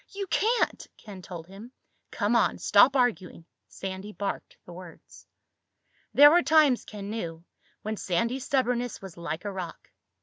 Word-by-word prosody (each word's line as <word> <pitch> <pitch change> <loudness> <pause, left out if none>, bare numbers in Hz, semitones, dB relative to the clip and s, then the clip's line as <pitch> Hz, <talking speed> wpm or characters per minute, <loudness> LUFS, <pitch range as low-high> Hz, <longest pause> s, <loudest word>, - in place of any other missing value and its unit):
"You 395 0 -5
can't!" 435 +8 0
Ken 200 -3 -11
told 175 -3 -9
him. 200 +7 -12 0.4
"Come 210 +2 0
on. 230 - +2
Stop 250 +7 +5
arguing." 210 -10 -1 0.2
Sandy 190 +2 -7
barked 200 -1 -5
the 175 - -11
words. 175 -1 -14 0.8
There 290 +1 +8
were 350 +2 +5
times, 305 -6 +3
Ken 205 -1 -8
knew, 170 -7 -5 0.4
when 215 0 -4
Sandy's 230 +9 -2
stubbornness 245 -3 -1
was 195 -3 -11
like 170 +2 -6
a 205 - -3
rock. 185 -4 -8
210 Hz, 145 wpm, -27 LUFS, 185-250 Hz, 0.8 s, There